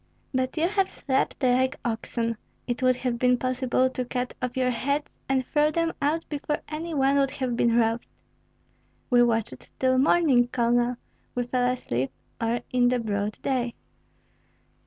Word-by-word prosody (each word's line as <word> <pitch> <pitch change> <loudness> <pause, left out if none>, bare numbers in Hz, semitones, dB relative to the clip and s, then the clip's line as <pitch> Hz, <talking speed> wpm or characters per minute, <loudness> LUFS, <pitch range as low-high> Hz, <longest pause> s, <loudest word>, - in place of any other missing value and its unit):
"But 260 +3 -1
you 325 +2 +3
have 390 0 +1
slept 270 0 -1
like 260 +2 +3
oxen; 230 0 -2 0.3
it 240 0 -3
would 255 0 +4
have 245 -1 -2
been 250 0 +4
possible 255 0 +1
to 255 - -2
cut 250 0 -3
off 250 0 -3
your 255 -1 +2
heads 280 +5 -2
and 265 -1 +1
throw 300 +2 +2
them 330 +1 0
out 305 +3 0
before 295 0 -2
any 320 +2 -4
one 275 0 +3
would 275 -1 +3
have 260 -3 -2
been 235 0 +3
roused." 230 0 +1 1.0
"We 245 -1 +6
watched 225 - 0
till 260 0 +3
morning, 275 -4 +4
Colonel; 240 0 +1 0.4
we 245 - +1
fell 245 +1 +1
asleep 135 - -2 0.3
only 230 +1 -1
in 250 -1 +3
the 250 0 +2
broad 210 -2 -2
day." 250 -3 -1
250 Hz, 160 wpm, -26 LUFS, 240-275 Hz, 1.0 s, We